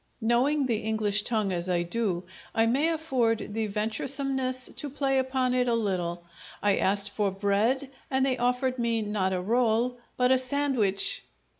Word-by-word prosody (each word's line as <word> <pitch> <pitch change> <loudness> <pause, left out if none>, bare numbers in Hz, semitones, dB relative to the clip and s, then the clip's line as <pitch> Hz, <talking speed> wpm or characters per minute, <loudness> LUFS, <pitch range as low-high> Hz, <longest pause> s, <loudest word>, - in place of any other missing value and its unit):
Knowing 260 +6 +2
the 235 -4 +1
English 215 -2 0
tongue 215 -3 -1
as 175 0 -3
I 175 -1 +2
do, 185 -1 -1 0.3
I 225 - +4
may 265 +7 +2
afford 255 -10 0
the 220 0 -1
venturesomeness 255 +5 -2
to 290 - -4
play 270 -1 +1
upon 260 -1 0
it 250 0 +2
a 235 - +2
little: 180 -6 -1 0.4
I 205 -1 +3
asked 200 +1 +1
for 205 -1 0
bread, 205 +8 +1 0.2
and 265 0 +2
they 265 -1 +1
offered 250 +1 0
me 230 -2 +1
not 205 -2 0
a 185 - 0
role, 235 +4 +1 0.2
but 250 0 +3
a 260 - +5
sandwich! 255 -7 0
230 Hz, 165 wpm, -28 LUFS, 205-260 Hz, 0.4 s, a